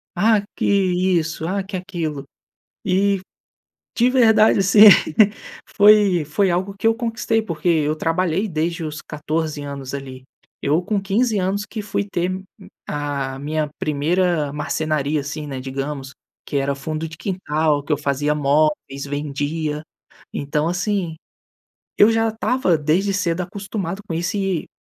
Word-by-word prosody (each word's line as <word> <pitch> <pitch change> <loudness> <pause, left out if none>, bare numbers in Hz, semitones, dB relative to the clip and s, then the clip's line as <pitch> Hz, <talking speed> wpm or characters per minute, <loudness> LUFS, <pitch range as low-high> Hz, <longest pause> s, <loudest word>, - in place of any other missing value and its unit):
Ah, 215 +3 +3
que - - -2
isso, 180 -5 +1
ah, 195 +2 -1
que 195 0 -7
aquilo." 170 -6 -4 0.6
E, 195 0 +2 0.8
de 245 +1 +4
verdade, 220 -5 +5
assim, 200 +2 +6 0.9
foi 205 -5 +6
foi 180 +6 +1
algo 185 +3 -1
que - - -1
eu 225 - +5
conquistei, 225 -1 -1
porque 175 -4 -3
eu 155 -2 +2
trabalhei 175 +5 0
desde 165 0 -2
os 155 0 -5
14 155 0 -3
anos 140 -2 -6
ali. 130 -2 -7 0.4
Eu 155 +5 +2
com 205 +3 -1
15 210 +3 +1
anos 195 +2 -1
que 220 - -5
fui 200 0 -2
ter 175 -3 -1
m 190 +1 -5 0.4
a 140 -2 -3
minha 150 +2 -2
primeira 155 0 0
marcenaria, 150 0 -1
assim, 150 +2 -5
né, 135 -2 -5
digamos, 135 +1 -5 0.3
que 145 - -3
era 140 0 0
fundo 155 +3 -4
de 160 - -11
quintal, 155 -6 0
que 150 - -2
eu 145 - +2
fazia 145 +1 0
móveis, 145 -1 +1
vendia. 150 +1 -3 0.5
Então 150 +3 -1
assim, 180 -2 -1 0.8
eu 205 - +7
já 225 0 +2
estava 220 -5 +1
desde 170 +7 +1
cedo 180 -3 0
acostumado 195 0 -5
com - - -4
isso 175 +5 -1
e 195 -5 -1
165 Hz, 145 wpm, -21 LUFS, 150-195 Hz, 0.9 s, eu